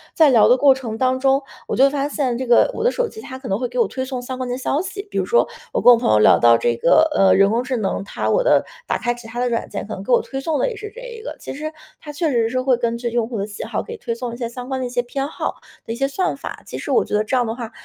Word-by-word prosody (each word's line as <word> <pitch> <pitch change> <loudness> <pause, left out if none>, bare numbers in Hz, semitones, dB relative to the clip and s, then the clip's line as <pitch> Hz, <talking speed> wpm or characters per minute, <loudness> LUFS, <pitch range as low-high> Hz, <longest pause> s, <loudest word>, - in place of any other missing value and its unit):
在 310 -4 +6
聊 225 -4 +6
的 250 - +6
过 275 +1 +6
程 240 -4 -6
当 255 +1 +1
中， 270 +1 +2 0.2
我 - - -2
就 270 +2 +6
发 285 0 -1
现 270 -5 -1
这 260 - -3
个 240 - +5
我 450 - -4
的 480 - +4
手 - - -1
机 440 0 -10
它 260 -8 -8
可 260 - -9
能 195 +2 -1
会 250 - -1
给 - - -8
我 470 - +3
推 260 - -4
送 260 -1 -4
相 245 +1 -6
关 255 -1 -3
的 245 - -2
消 275 +4 -1
息， 400 +1 -6
比 - - -1
如 - - 0
说 475 - +3 0.3
我 - - +1
跟 245 - +8
我 - - +4
朋 245 - +1
友 110 - +5
聊 105 - +6
到 115 0 +6
这 120 0 0
个 315 - +4
呃， 195 -1 +5
人 200 +1 +4
工 235 +2 +1
智 255 0 -2
能 195 -2 -2
它 195 - -4
我 - - +2
的 - - +3 0.2
打 - - 0
开 240 -1 -1
其 240 -1 -12
它 235 +2 -6
的 250 - +1
软 235 -1 -2
件 200 - -5
可 215 - -6
能 190 - -7
给 250 - -4
我 240 - +6
推 270 - -5
送 315 +2 -1
的 - - +1
也 475 - -6
是 425 0 -7
这 - - -9
一 480 -3 -9
个。 460 - -7
其 - - -7
实 305 +3 -5 0.3
它 295 - -8
确 315 +2 0
实 230 -2 +2
是 255 +1 -1
会 255 -2 +2
根 235 -1 -1
据 240 0 -3
用 235 -1 0
户 235 -2 -5
的 200 - -2
喜 205 - -7
好 - - -3
给 465 0 -8
推 235 - -4
送 240 0 -5
一 235 - -7
些 240 - -3
相 250 +1 -8
关 265 -1 -2
的 255 - -2
一 - - -4
些 245 0 0
偏 270 +3 -4
好 305 - -4 0.3
的 - - -6
一 - - -5
些 275 +3 0
算 365 +7 -1
法。 - - -8
其 - - -7
实 - - -5
我 445 - +4
觉 - - -8
得 210 +1 +2
这 215 - -2
样 245 -1 +2
的 225 - -2
话， 235 -3 -7
255 Hz, 365 characters per minute, -20 LUFS, 235-285 Hz, 0.3 s, 跟